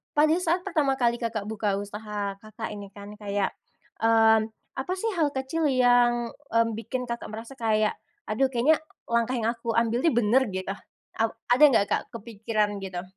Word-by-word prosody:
pada 305 +1 +5
saat 355 +1 0
pertama 300 -8 +1
kali, 240 -2 +1
Kakak, 225 -3 -2
buka 210 -1 -1
usaha, 205 -1 -5
Kakak, 215 +1 -7
ini 205 -1 -7
kan 205 0 -9
kayak, 200 -1 -1 0.5
mmm, 225 -1 +4 0.3
apa 360 +8 -2
sih 450 +4 -2
hal 325 -6 +2
kecil 295 +4 0
yang, 245 -2 +3
mmm, 230 -5 0
bikin, 250 +3 -4
Kakak, 235 0 -5
merasa 225 +4 -8
kayak 215 -2 +2 0.3
aduh 245 +5 +1
kayaknya 265 +6 +3 0.3
langkah 235 +2 +1
yang 230 0 +1
aku 235 0 -8
ambil 230 +1 +2
nih 330 - +3
bener 240 +4 +4
gitu 190 +1 -3 0.4
a 225 - +1 0.3
ada 255 +5 +5
nggak 205 -4 +1
kepikiran 215 -1 -2
gitu? 185 -1 -5
230 Hz, 165 wpm, -26 LUFS, 210-255 Hz, 0.5 s, pada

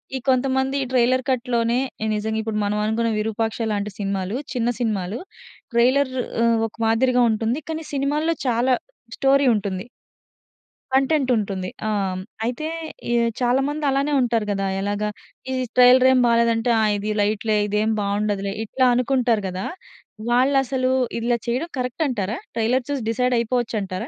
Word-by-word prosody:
ఈ - - -1
కొంతమంది 265 +1 +1
ట్రైలర్ 255 +1 +3
కట్‌లోనే 240 -2 +1 0.4
నిజంగా 220 +1 -2
ఇప్పుడు 215 -1 -2
మనం 205 +1 -1
అనుకున్న 225 +1 0
విరూపాక్ష 225 +1 -2
లాంటి 205 0 -3
సినిమాలు. 195 +1 -2 0.2
చిన్న 240 -1 0
సినిమాలు 210 -3 -2 0.6
ట్రైలర్ 255 +3 +3 0.3
ఆహ్, 230 0 +3
ఒక - - -24
మాదిరిగా 250 +2 +3
ఉంటుంది. 225 +6 -1
కానీ 320 0 -4
సినిమాల్లో 295 +4 0
చాలా 245 +2 +2 0.4
స్టోరీ 275 0 +3
ఉంటుంది. 195 -1 -3 1.1
కంటెంట్ 270 0 +2
ఉంటుంది. 195 -3 -3 0.2
ఆ! - - 0 0.6
అయితే 250 +6 -3 0.4
ఈ - - +2 0.3
చాలామంది 270 +5 +1
అలానే 275 +2 0
ఉంటారు 230 -3 +1
గదా. 195 -1 -1
ఎలాగా? 205 +1 -1 0.4
ఈ - - -1 0.2
ట్రైలరేమి 255 +1 +6
బాలేదంటే 235 0 +2
ఆ - - +2
ఇది 210 +1 -3
లైట్ 210 +1 0
లే 215 - +3
ఇదేం 210 +2 +1
బావుండదులే. 200 -1 -1
ఇట్లా 255 +4 +1
అనుకుంటారు 245 -3 +1
గదా. 185 +1 -4 0.6
వాళ్ళసలు 260 +1 +2 0.3
ఇలా 235 +1 +1
చేయడం 255 +8 -1
కరక్ట్ 250 +5 -2
అంటారా? 220 -4 -2 0.2
ట్రైలర్ 235 +3 +1
చూసి 285 -2 -1
డిసైడ్ 250 +2 +1
అయిపోవచ్చంటారా? 225 -5 -2
235 Hz, 135 wpm, -22 LUFS, 215-260 Hz, 1.1 s, ట్రైలరేమి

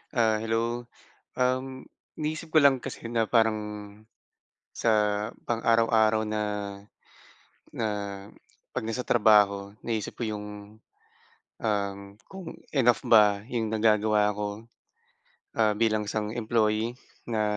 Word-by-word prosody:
Ah, 110 -2 +3
hello. 115 +2 -1 0.5
Um, 130 +1 -1 0.3
iniisip 155 +1 -4
ko 155 - +6
lang 135 -3 +4
kasi - - -6
na 115 -1 +1
parang 110 -1 +2 1.1
sa - - -1 0.6
pang-araw-araw 115 -1 +3
na 105 0 -2 1.3
na 115 - -3 0.9
pag - - -2
nasa 115 +3 -3
trabaho. 105 -3 +3
Naisip 110 -3 -3
ko - - -3
yung, 105 -1 -4 1.2
um 100 -2 0 0.3
kung 190 -4 -8 0.2
enough 120 -3 +4
ba 105 -3 +6
yung 115 -4 -2
nagagawa 105 -1 +3
ko. 105 0 -2 1.0
Ah, 110 -2 +2
bilang 110 -1 +1
isang 105 0 -2
employee 110 0 0 0.3
na 110 -2 0
110 Hz, 105 wpm, -27 LUFS, 105-120 Hz, 1.3 s, ko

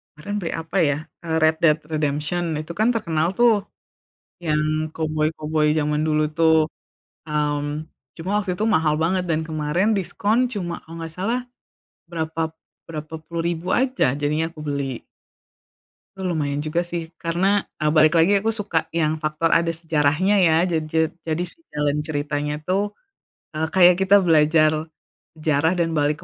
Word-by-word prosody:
kemaren 205 +8 -6
beli 170 -4 -3
apa 165 +4 -4
ya 145 -4 +2 0.3
eee, 160 -1 -1
Red 160 0 +4
Dead 155 -3 +5 0.2
Redemption. 150 +3 -1
Itu 155 +2 -5
kan 220 - +4
terkenal 165 -7 0
tuh 230 -4 +4 0.8
yang 155 0 0
koboi-koboi 155 -1 0
zaman 150 0 0
dulu 155 0 +2
tuh, 160 -1 +5 0.7
mmm, 150 0 -2 0.3
cuma 175 - -5
waktu 195 -3 -1
itu 210 +5 -2
mahal 155 -1 +2
banget 185 +2 +1
dan 160 -1 +1
kemaren 155 +6 0
diskon 205 +4 0
cuma 175 -5 -3
kalo 165 - -12
nggak 165 -1 -6
salah, 225 +7 0 0.7
berapa 160 -1 -3 0.5
berapa 155 0 -7
puluh 170 0 -4
ribu 170 +1 -3
aja, 260 +1 +1
jadinya 150 +3 0
aku 155 - -13
beli. 140 -4 -2 1.2
Lu 185 -2 -2
lumayan 145 -2 -1
juga 165 +3 0
sih 170 -1 -5
karena, 170 +3 0 0.3
eee, 150 0 +2
balik 155 0 +5
lagi, 170 +5 +5
aku 225 - 0
suka 210 -6 -2
yang 155 -1 0
faktor 155 +2 0
ada 165 0 +3
sejarahnya 165 +3 +1
ya. 160 -3 +4
Ja 175 -3 0
ja 160 +1 0 0.3
jadi 160 +2 0
si 330 - -10
jalan 150 0 0
ceritanya 145 -1 -2
tuh, 200 +3 -1 0.6
eee, 155 +1 -1
kayak 180 -1 +7
kita 190 +1 +5
belajar 155 -1 +4 0.6
sejarah 155 +1 +1
dan 165 -1 0
balik 150 -1 +1
160 Hz, 155 wpm, -22 LUFS, 150-175 Hz, 1.2 s, kayak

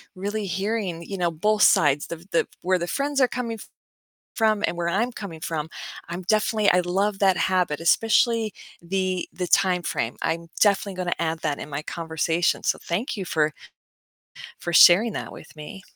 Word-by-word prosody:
really 205 +2 -3
hearing, 190 -2 -2
you 195 +3 -6
know, 175 -1 0
both 210 +6 +1
sides, 145 -1 +4
the 170 0 -8
the 170 - +1
where 185 +1 +2
the 170 - -2
friends 280 +6 -1
are 255 - +5
coming 235 -2 -4 0.8
from 215 -2 +2
and - - -3
where 170 0 -1
I'm 230 +7 0
coming 185 -8 -8
from, 160 -2 -3 0.4
I'm 175 +2 -5
definitely 215 +1 +2
I 180 0 +3
love 195 +3 -1
that 190 -3 +3
habit, 180 -3 +1
especially 225 +5 +2 0.3
the 185 +1 -2
the 180 0 -4
timeframe. 175 -11 +1
I'm 165 +1 -2
definitely 200 -2 +2
gonna 180 -1 -1
add 165 -1 -1
that 145 - -1
in - - -7
my 145 +1 -4
conversation, 165 0 -1
so - - +1
thank 200 +9 -3
you 195 - -4
for 155 -2 0 1.1
for 175 - -4
sharing 195 +7 +7
that - - -5
with - - -13
me. 155 +6 -9
185 Hz, 175 wpm, -24 LUFS, 170-210 Hz, 1.1 s, sharing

